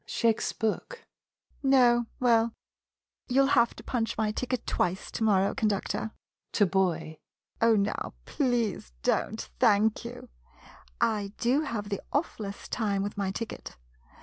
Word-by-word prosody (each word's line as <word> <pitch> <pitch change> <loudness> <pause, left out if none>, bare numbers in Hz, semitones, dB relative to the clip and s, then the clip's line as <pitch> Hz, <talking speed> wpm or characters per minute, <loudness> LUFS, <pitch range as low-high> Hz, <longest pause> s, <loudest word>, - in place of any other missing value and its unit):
[Shakes 230 -1 +1
book.] 460 - -3 0.6
No 245 -4 +4
— - - -34
well 230 -2 +3 0.4
— - - -65
you 260 +2 +4
'11 275 +1 +3
have 235 0 +4
to - - -11
punch 230 -3 -2
my 215 -1 +1
ticket 255 +3 -2
twice 180 +2 -1
to - - -2
morrow, 195 -3 +3
conductor. 215 0 -1 0.4
[To 205 - +4
boy.] 175 -4 0 0.4
Oh, 230 0 +5
now 200 0 -1
— - - -34
please 235 - -1
don't - - 0
— - - -35
thank 210 +2 +4
you! - - -8 0.7
I 205 -2 0
do 255 +5 +2
have 210 -7 -4
the 200 - -2
awfullest 215 -9 -3
time 200 -4 0
with 205 - -4
my 200 -2 -1
ticket. 220 +4 -6
220 Hz, 150 wpm, -28 LUFS, 200-240 Hz, 0.7 s, Oh